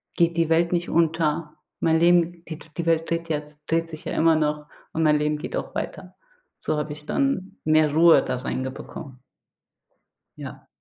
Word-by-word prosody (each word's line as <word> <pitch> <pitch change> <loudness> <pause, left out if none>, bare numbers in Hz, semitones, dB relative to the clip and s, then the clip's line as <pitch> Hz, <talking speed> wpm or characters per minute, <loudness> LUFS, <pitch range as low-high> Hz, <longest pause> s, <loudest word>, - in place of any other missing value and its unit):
geht 170 -1 +2
die 165 - +2
Welt 170 +1 +3
nicht 175 0 -1
unter. 160 -1 +1 0.3
Mein 160 -1 +3
Leben 170 0 +3
die 160 - -5 0.2
die 170 - -2
Welt 165 -1 +1
dreht 165 0 -2
jetzt 150 -1 -4
dreht 165 0 0
sich 155 -1 -10
ja - - -3
immer 165 0 +4
noch 150 -1 -1 0.3
und 160 - 0
mein 150 -1 +4
Leben 150 0 0
geht 160 - -6
auch - - -6
weiter. - - -5 0.4
So - - -2
habe 150 0 -3
ich 150 0 -13
dann 275 - -1
mehr 155 -1 +3
Ruhe 165 +2 +6
da 125 - -2
reinge 130 0 -3
bekommen. 130 0 -10 1.2
Ja. - - -9
160 Hz, 185 wpm, -24 LUFS, 150-170 Hz, 1.2 s, Ruhe